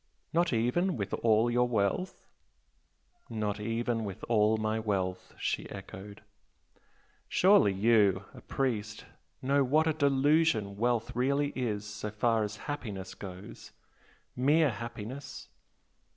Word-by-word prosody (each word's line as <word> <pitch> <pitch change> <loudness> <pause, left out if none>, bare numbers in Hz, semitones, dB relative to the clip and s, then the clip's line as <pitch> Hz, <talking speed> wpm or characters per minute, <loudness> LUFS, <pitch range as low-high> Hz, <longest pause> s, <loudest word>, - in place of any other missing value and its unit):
"Not 170 0 +2
even 125 +10 +1
with 100 -3 -4
all 115 +1 +3
your 125 +1 +3
wealth?" 115 - -1 1.0
"Not 105 -1 -2
even 115 +1 -1
with 100 -3 -7
all 110 -1 +3
my 110 0 -1
wealth!" 95 -4 -2
she - - -2
echoed. 100 +2 -10 1.1
"Surely 190 - +5
you 100 -1 +3
a - - -12
priest 110 -6 -2 0.4
know 140 +2 +3
what 155 +5 +3
a 160 - +2
delusion 140 -6 +2
wealth 120 +1 0
really 140 +3 +1
is 105 -5 -2
so 105 +1 -5
far 110 +1 +1
as 105 0 -4
happiness 105 -10 -5
goes? 95 0 -10 0.6
mere 145 +3 +3
happiness? 115 +4 -7
115 Hz, 120 wpm, -30 LUFS, 105-135 Hz, 1.1 s, Surely